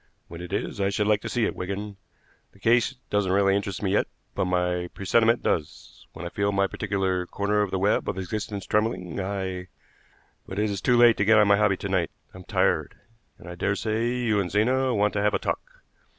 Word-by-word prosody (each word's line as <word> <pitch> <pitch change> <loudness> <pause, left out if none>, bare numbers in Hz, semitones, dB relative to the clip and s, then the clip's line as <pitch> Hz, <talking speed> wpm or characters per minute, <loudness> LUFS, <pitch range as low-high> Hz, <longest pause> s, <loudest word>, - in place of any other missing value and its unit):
When 85 +1 -8
it 90 - -8
is - - -3
I 100 - +2
should 105 +1 0
like 105 0 +2
to - - -5
see 120 -3 +1
it, - - -2
Wigan. 100 +2 -5 0.6
The 100 - -21
case 120 +5 +2 0.2
doesn't 105 -2 +1
really 95 0 +3
interest 100 0 -3
me 95 - +1
yet, 100 - +2 0.3
but - - 0
my 90 -1 0
presentiment 115 +4 +2
does. 75 -3 -3
When 85 - -8
I - - -3
feel 100 +2 0
my 100 0 +2
particular 95 -3 -1
corner 105 +2 0
of 105 - 0
the 95 - -1
web 100 +2 +1
of 95 - -3
existence 100 0 -4
trembling 100 -5 -1
I 95 -1 -3 0.8
but 95 - -7
it 105 0 +1
is 100 - -4
too 125 -1 +3
late 120 -1 +6
to - - +2
get 110 +1 +6
on 105 -1 +5
my 100 0 +5
hobby 100 -2 +2
to - - -5
night. 90 -5 0 0.2
I'm 90 0 -11
tired, - - +1 0.4
and - - -14
I 85 - -6
dare 95 +3 -1
say 110 +2 -1
you 115 -4 +1
and 95 -3 -1
Zena 130 +7 +2
want 105 -1 +2
to 105 - 0
have 105 0 +2
a - - +3
talk. - - -5
100 Hz, 220 wpm, -25 LUFS, 95-105 Hz, 0.8 s, late